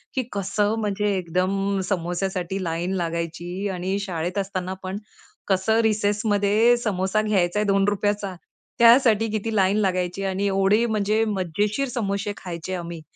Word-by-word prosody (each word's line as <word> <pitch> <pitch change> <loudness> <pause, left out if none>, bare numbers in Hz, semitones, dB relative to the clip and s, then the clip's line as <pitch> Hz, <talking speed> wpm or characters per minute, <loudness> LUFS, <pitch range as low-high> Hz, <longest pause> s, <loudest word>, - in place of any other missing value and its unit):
की 260 - +1
कसं 200 +1 0
म्हणजे 210 -1 0
एकदम 190 +3 0
समोस्यासाठी 185 +1 -2
लाईन 170 +2 -2
लागायची. 170 +3 -4
आणि 185 +2 -2
शाळेत 180 -2 -3
असताना 190 -2 -2
पण 190 +1 -4 0.5
कसं 200 +3 +2
रिसेसमध्ये 210 +1 +2
समोसा 205 -2 0
घ्यायचाय 210 -1 +1
₹2चा, 205 0 0 0.4
त्यासाठी 230 -2 +6
किती 215 +1 -2
लाईन 195 0 +3
लागायची 185 -1 -1
आणि 195 +1 -1
एवढे 195 +3 +3
म्हणजे 215 -1 +1
मजेशीर 205 - -1
समोसे 205 -4 -2
खायचे 175 0 -6
आम्ही. 170 -2 -6
195 Hz, 125 wpm, -24 LUFS, 185-210 Hz, 0.5 s, त्यासाठी